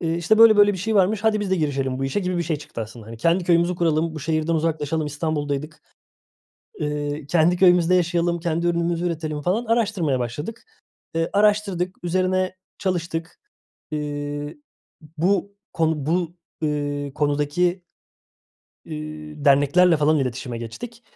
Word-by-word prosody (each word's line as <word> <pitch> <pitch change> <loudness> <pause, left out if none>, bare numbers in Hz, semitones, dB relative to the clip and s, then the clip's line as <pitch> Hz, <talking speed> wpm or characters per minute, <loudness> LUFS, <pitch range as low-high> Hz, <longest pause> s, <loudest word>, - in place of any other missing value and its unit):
eee, 165 -1 -1
işte, 170 +6 +2
böyle, 225 -2 +8
böyle 205 0 +6
bir 190 - -5
şey 220 +5 -1
varmış. 205 +2 +2
Hadi 215 -1 +3
biz 200 -2 -3
de 190 - +3
girişelim 135 -4 -1
bu 135 - -2
işe 135 +9 -1
gibi 180 -2 -2
bir - - +1
şey 160 -2 -1
çıktı 145 -5 -8
aslında. 110 0 -8
Hani, 115 - -9
kendi 170 +9 +1
köyümüzü 170 +1 +3
kuralım, 165 -1 0
bu 155 - -6
şehirden 155 +2 0
uzaklaşalım, 160 -1 -1
İstanbul'daydık. 150 0 -3 1.0
Eee, 150 0 -3
kendi 170 +3 +3
köyümüzde 180 -1 +5
yaşayalım, 175 -1 +1
kendi 170 0 -1
ürünümüzü 170 0 0
üretelim 155 -3 -3
falan, 195 +9 0
araştırmaya 205 - +1
başladık. 145 - -5 0.5
Eee, 165 0 0
araştırdık, 200 -3 +1
üzerine 185 +1 0 0.2
çalıştık. 170 -3 -3 0.5
Eee, 145 -1 -4 0.6
bu 200 +4 +1 0.2
konu 160 -4 0
bu, 175 +1 -1 0.3
eee, 145 -2 -2
konudaki 150 +5 0 1.0
eee, 155 -1 -7
derneklerle 145 +5 +5
falan 150 +1 +3
iletişime 125 -2 -3
geçtik. 230 - -8
165 Hz, 145 wpm, -23 LUFS, 150-180 Hz, 1.0 s, böyle